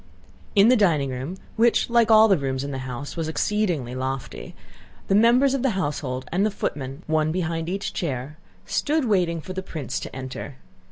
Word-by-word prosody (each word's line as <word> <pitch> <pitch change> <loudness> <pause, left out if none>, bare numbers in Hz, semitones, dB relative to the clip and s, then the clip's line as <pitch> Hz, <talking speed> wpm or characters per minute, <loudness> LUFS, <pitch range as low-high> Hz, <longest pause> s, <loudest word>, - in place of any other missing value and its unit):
In 205 +3 +6
the 255 - +6
dining 160 - +2
room, 130 +9 -5 0.2
which 230 +1 +3
like 235 -1 +3
all 220 0 +8
the 195 - +5
rooms 135 -3 -2
in 140 - -4
the 135 - -4
house 130 +3 -6
was 165 -2 -2
exceedingly 165 - -1
lofty, 130 0 -5 0.5
the - - +3
members 240 +6 +5
of 275 - 0
the 270 - +2
household 140 -6 -3
and 185 +3 +1
the 215 - +3
footmen—one 155 -2 -2
behind 165 -1 -2
each 195 +2 -3
chair—stood 165 - -3
waiting 175 -7 +1
for 185 - -7
the 190 - -3
prince 160 -7 -5
to - - -8
enter. 130 +1 -6
165 Hz, 175 wpm, -24 LUFS, 135-210 Hz, 0.5 s, all